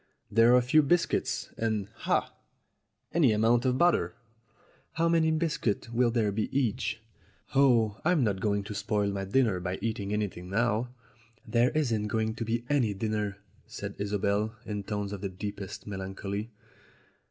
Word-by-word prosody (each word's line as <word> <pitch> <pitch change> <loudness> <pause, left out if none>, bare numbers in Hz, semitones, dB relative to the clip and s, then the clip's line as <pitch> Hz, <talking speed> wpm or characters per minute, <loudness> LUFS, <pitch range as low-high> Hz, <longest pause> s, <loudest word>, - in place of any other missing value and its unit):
There 115 +2 +6
are - - +7
a 125 - +3
few 145 +6 +5
biscuits, 140 - 0
and 110 -3 0 0.2
ah! - - +1 0.8
any 155 -8 +4
amount 115 +3 +3
of 130 0 +2
butter." 130 - +2 0.8
"How 165 +1 +1
many 165 -1 +3
biscuits 155 -9 -1
will 120 +1 +3
there 115 -3 +1
be 105 +2 -1
each 115 -3 -1 0.2
?" - - -28
"Oh, 120 -6 +3
I'm 165 -4 +3
not 100 -4 0
going 100 0 0
to 105 - -6
spoil 100 0 0
my 100 0 -3
dinner 105 -2 +2
by 90 +1 -3
eating 105 -2 -3
anything 100 -4 -3
now." 115 +3 +1 0.6
"There 120 +2 +3
isn't 115 -9 +1
going 110 +1 0
to 115 - -4
be 115 +1 -2
any 125 -8 +1
dinner," 105 -1 -2 0.3
said - - -6
Isobel, 100 +2 0
in 105 -2 -4
tones 105 -1 -3
of 100 - -6
the 100 - -2
deepest 100 +2 -6
melancholy. 100 +2 -5
110 Hz, 160 wpm, -29 LUFS, 100-120 Hz, 0.8 s, are